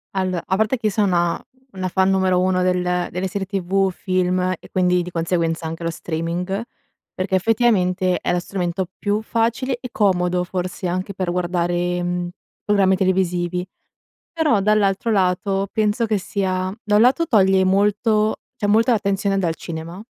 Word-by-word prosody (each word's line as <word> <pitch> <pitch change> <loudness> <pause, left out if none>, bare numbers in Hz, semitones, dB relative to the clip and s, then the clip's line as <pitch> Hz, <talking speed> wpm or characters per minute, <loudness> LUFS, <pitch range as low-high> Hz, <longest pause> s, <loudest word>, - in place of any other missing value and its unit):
Allo 185 -2 0
a 190 - 0
parte 220 +5 +1
che 220 -2 -1
io - - 0
sono 180 -5 +1 0.3
una 185 -1 -3
fan 190 +1 +2
numero 190 -1 +2
uno 185 0 +2
del 180 -1 0
delle 185 +2 -2
serie 195 +1 -3
tv, 195 0 0
film 185 0 0 0.2
e - - -16
quindi 180 -1 +2
di 175 +1 -6
conseguenza 165 -1 -1
anche 165 +1 -6
lo 165 - 0
streaming, 170 +5 -3 0.5
perché 190 +1 -1
effettivamente 185 -4 +2
è - - -1
lo 175 - +1
strumento 180 0 -3
più 205 +1 -1
facile 235 +3 -1
e 250 - -7
comodo 180 -3 +1
forse 180 0 -4
anche 185 +3 -3
per 185 -2 -3
guardare, 175 0 -1
mhmm, 175 0 -2 0.3
programmi 195 -2 +3
televisivi; 180 -1 0 0.7
però 310 - +2
dall'altro 205 +1 +2
lato 195 0 +1
penso 215 +1 +1
che 215 -1 +1
sia 185 -1 -2
da 210 - 0
un - - +5
lato 260 +8 +4
toglie 190 -6 +4
molto, 210 +3 +2 0.2
cioè, 205 - -2
molta 225 +4 +4
attenzione 200 -1 0
dal 170 -4 0
cinema, 165 +2 -7
185 Hz, 160 wpm, -21 LUFS, 180-205 Hz, 0.7 s, un